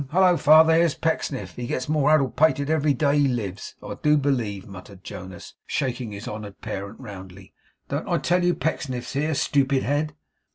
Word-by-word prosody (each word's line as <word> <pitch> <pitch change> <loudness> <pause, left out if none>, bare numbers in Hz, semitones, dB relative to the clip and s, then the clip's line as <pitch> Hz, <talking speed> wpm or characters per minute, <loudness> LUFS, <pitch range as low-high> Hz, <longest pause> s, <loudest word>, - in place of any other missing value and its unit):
Hallo 180 +2 +4
father, 160 +1 +6
here's 165 -1 +3
Pecksniff! 160 -4 -2
He 120 -1 -5
gets 130 -2 -3
more 150 -1 +2
addle 145 -4 +3
pated 155 -1 +2
every 150 -2 +2
day 145 +2 +2
he 145 - +4
lives, 105 -7 -4
I - - -6
do 150 0 +4
believe,' 120 -9 -1
muttered 95 0 -12
Jonas, 95 -1 -9
shaking 125 -4 -2
his 100 +2 -8
honoured 105 -2 -7
parent 100 +2 -6
roundly. 95 -5 -11 0.3
'Don't - - -3
I - - +2
tell 180 +1 +1
you 175 0 +2
Pecksniff's 130 -4 -3
here, 150 +3 0
stupid 135 -1 +1
head? 145 +2 -1
135 Hz, 175 wpm, -24 LUFS, 105-155 Hz, 0.3 s, father